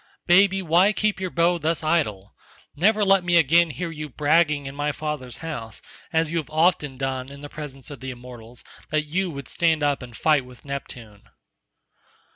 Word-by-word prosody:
Baby, 190 +2 +4
why 180 +5 +4
keep 210 -1 0
your 185 -1 -2
bow 170 +1 +2
thus 160 +1 0
idle? 125 - 0 0.4
Never 210 +6 +3
let 195 -1 +4
me 175 -1 +3
again 170 +2 +4
hear 170 +2 -4
you 155 -1 -6
bragging 150 +1 +2
in 135 - -6
my 145 +1 -1
father's 150 -5 -5
house, 115 -9 -6 0.3
as 160 -1 +1
you 170 - 0
have 155 - -7
often 155 -4 +1
done 130 -1 -3
in 140 0 -11
the 145 - -8
presence 145 -2 -8
of 140 - -9
the 130 - -6
immortals, 120 -1 -11 0.3
that 155 0 +1
you 180 +5 -1
would 140 -4 -7
stand 160 -3 +1
up 145 -1 +1
and 120 -2 -10
fight 150 -4 +3
with 125 +1 -16
Neptune." 120 -7 -8
150 Hz, 185 wpm, -24 LUFS, 135-170 Hz, 0.4 s, Baby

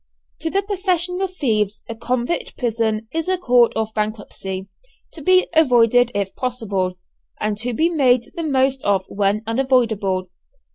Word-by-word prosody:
To 325 - -2
the 395 +4 0
professional 375 -2 0
thieves 220 - -1
a 230 - -4
convict 240 +6 -2
prison 225 -2 -1
is 325 +1 -2
a 375 - +2
Court 245 -8 +4
of 220 0 -2
Bankruptcy, 205 -3 -4 0.4
to 320 - -10
be 370 +4 +4
avoided 245 -5 +4
if 200 -1 -2
possible, 205 -8 -2 0.4
and 215 0 -1
to 245 +3 -2
be 320 +8 +3
made 255 -8 +2
the 340 - -4
most 270 -3 +1
of 195 -2 +1
when 205 +1 0
unavoidable. 225 -7 +1
240 Hz, 145 wpm, -20 LUFS, 215-315 Hz, 0.4 s, Court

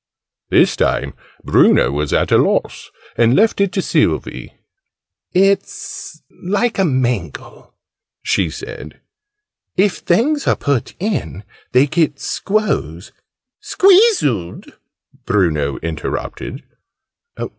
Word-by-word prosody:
This - - +3
time - - -1 0.3
Bruno 65 - +4
was 75 0 -2
at - - +1
a - - +6
loss, - - -1 0.3
and 120 +2 +3
left 215 -1 +2
it 200 -2 +1
to 190 - -1
Sylvie. - - -1 0.8
"It's 195 -4 -1 0.2
like 205 +5 0
a 195 - +3
mangle," 125 - -3 0.5
she 95 -4 0
said: 80 - -9 0.8
"if 195 0 +2
things 275 - 0
are - - +3
put 140 -5 -2
in, 190 - -3 0.3
they 130 +3 +4
get 150 -1 0
squoze 105 - -2 0.3
" 255 +10 -66
"Squeezeled!" 370 - +3 0.5
Bruno 75 -8 0
interrupted. 85 - -5
145 Hz, 100 wpm, -17 LUFS, -, 0.8 s, a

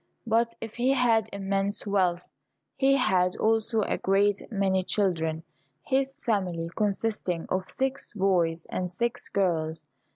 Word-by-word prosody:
But 230 +1 +1
if 225 0 -8
he 255 +3 +3
had 225 -4 +2
immense 195 +1 0
wealth, 185 -3 +1 0.5
he 270 0 +3
had 185 -8 +2
also 225 0 +1
a - - -1
great 200 +1 +2
many 190 -3 +1
children, 165 -5 0 0.4
his 270 0 -1
family 180 -7 -1
consisting 205 -4 -1
of 185 0 -2
six 265 +1 -1
boys 175 -5 +1
and 180 -1 -2
six 235 +6 -2
girls. 165 -5 -1
200 Hz, 130 wpm, -27 LUFS, 180-225 Hz, 0.5 s, he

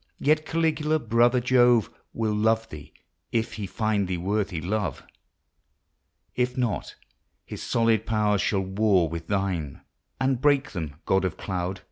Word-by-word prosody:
Yet 155 +2 +1
Caligula, 160 -1 +1
brother 120 -1 +3
Jove, 120 -2 +4 0.2
Will 110 -2 -1
love 110 +1 +1
thee 75 -1 -10 0.4
if 115 0 -1
he 105 -3 -5
find 105 -1 0
thee 90 -1 -2
worthy 100 0 -1
love; 90 -3 -2 1.3
If 125 0 -1
not, 120 -4 -2 0.5
his - - -8
solid 115 -2 +1
powers 105 -3 +2
shall 100 -2 +1
war 95 -2 +2
with 80 0 -6
thine 95 -8 -2 0.4
And 130 -2 +1
break 145 -2 +3
them, 80 -6 -5
God 95 0 +2
of 90 -4 -2
Cloud. 95 0 -3
110 Hz, 140 wpm, -26 LUFS, 95-120 Hz, 1.3 s, Jove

